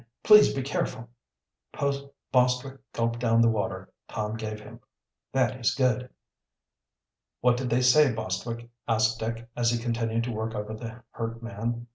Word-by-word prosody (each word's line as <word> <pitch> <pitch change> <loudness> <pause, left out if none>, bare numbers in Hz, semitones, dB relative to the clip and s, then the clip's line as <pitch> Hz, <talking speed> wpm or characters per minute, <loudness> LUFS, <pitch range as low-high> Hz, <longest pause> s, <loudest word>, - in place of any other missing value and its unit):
Please 210 -1 +8
be 135 - -2
careful!" 125 -3 -3 1.2
Bostwick 125 +1 +2
gulped 115 0 -1
down 115 -1 +3
the 115 - +6
water 110 -3 -3
Tom 105 0 -3
gave 110 -1 -5
him. 105 - -12 0.5
"That 130 -1 +1
is 120 - +1
good." 125 -1 +1 1.3
"What 125 0 +4
did 125 0 -2
they 125 +2 +2
say, 135 +3 +6
Bostwick?" 115 +1 -4 0.2
asked 110 0 +2
Dick, 115 +1 -4
as 120 -1 +2
he 120 - +1
continued 115 -1 -1
to 120 - -3
work 110 0 -3
over 105 +1 -4
the 115 +2 -8
hurt 115 0 -5
man. 115 +2 -3
115 Hz, 150 wpm, -27 LUFS, 115-125 Hz, 1.3 s, Please